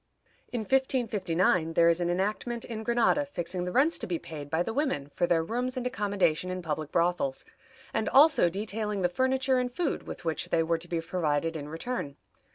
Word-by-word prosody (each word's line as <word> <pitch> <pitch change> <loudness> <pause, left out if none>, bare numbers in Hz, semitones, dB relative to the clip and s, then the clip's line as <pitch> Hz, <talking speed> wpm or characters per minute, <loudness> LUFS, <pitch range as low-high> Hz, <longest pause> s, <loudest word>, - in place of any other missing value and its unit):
In 240 - -2
1559, 205 -10 +1
there 170 +1 +5
is 170 +1 +3
an 175 - 0
enactment 210 +6 -1
in 225 -2 -5
Granada 240 +5 +2
fixing 180 -9 -4
the 180 - -3
rents 290 - +3
to - - -4
be 175 -2 -1
paid 150 -3 -8
by 160 +3 +1
the 225 - -4
women 265 - -1
for 175 - +1
their 165 -2 +2
rooms 250 +7 -2
and 250 - -3
accommodation 200 -8 0
in 185 0 -4
public 155 -1 -3
brothels, 170 -6 0 0.5
and 220 - 0
also 280 - +6
detailing 210 +1 -3
the 175 - +3
furniture 260 +5 +1
and 250 0 -1
food 305 +4 -2
with - - -8
which 160 -1 -2
they 165 - +2
were 165 0 0
to 175 - -9
be 170 -1 -1
provided 165 -2 -1
in 150 -1 -5
return. 165 - -4
185 Hz, 195 wpm, -28 LUFS, 165-245 Hz, 0.5 s, also